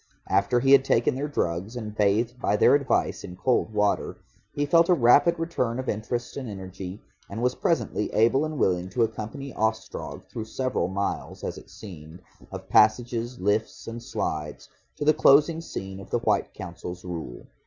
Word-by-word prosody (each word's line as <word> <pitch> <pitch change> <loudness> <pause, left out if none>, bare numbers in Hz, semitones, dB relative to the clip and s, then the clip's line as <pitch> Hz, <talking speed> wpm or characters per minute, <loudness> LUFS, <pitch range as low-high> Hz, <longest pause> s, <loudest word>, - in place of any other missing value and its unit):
After 100 +6 +2
he 135 - +3
had 140 -1 +8
taken 120 -3 +2
their 140 +3 -3
drugs 95 - -2
and 110 -3 -5
bathed 110 +5 +1
by 105 - +2
their - - +5
advice 140 -2 +1
in 90 - -8
cold 115 +3 +1
water, 105 -1 0 0.3
he 145 - -1
felt 165 +3 +4
a 180 - +6
rapid 145 +6 +5
return 145 -8 -1
of 130 - -4
interest 120 +3 -3
and 130 -4 -5
energy, 95 0 -7 0.3
and 100 - -6
was 125 0 +2
presently 160 -10 -1
able 120 +6 +3
and 155 -1 -3
willing 90 -5 +1
to 115 +5 +1
accompany 115 +5 -5
Ostrog 110 0 -3
through 110 - -6
several 130 -4 -1
miles 100 +2 -3
(as - - -4
it - - -18
seemed) 85 -3 -11 0.3
of - - -8
passages, 120 +2 +2
lifts, 105 +3 -1
and 115 +1 -6
slides 80 - -4 0.3
to 145 - -4
the 155 - +6
closing 155 +4 +5
scene 95 - -7
of 95 - -11
the - - +1
White 110 -4 0
Council's 90 0 -8
rule. 80 -9 -6
110 Hz, 175 wpm, -26 LUFS, 95-130 Hz, 0.3 s, had